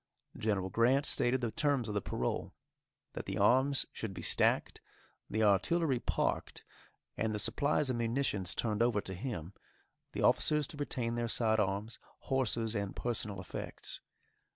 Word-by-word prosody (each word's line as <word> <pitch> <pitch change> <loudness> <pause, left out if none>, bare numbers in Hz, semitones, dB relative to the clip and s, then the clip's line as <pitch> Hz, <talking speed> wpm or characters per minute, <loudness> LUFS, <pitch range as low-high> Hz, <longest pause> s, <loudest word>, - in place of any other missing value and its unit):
General 100 -4 -1
Grant 125 +7 +3
stated 125 -1 +3
the 120 -2 -1
terms 140 -4 +1
of 105 - -3
the 105 - 0
parole; - - -3 0.6
that - - -6
the - - -3
arms 130 +2 +3
should 105 -4 -5
be 85 - -6
stacked, - - +2 0.5
the 110 +1 0
artillery 130 - +3
parked, - - -2 0.5
and 110 -1 0
the - - -1
supplies 145 +5 +1
and 120 - -2
munitions 115 -6 0
turned 110 -2 0
over 120 -3 +3
to 95 - -5
him, 95 - -5 0.6
the - - -2
officers 150 -1 +4
to 150 - -9
retain 125 -5 -2
their 120 0 -1
side 110 -1 +2
arms, 105 +3 -1 0.2
horses, 115 -4 0
and 100 -3 -3
personal 110 -5 -3
effects. 90 - -6
115 Hz, 155 wpm, -33 LUFS, 105-130 Hz, 0.6 s, officers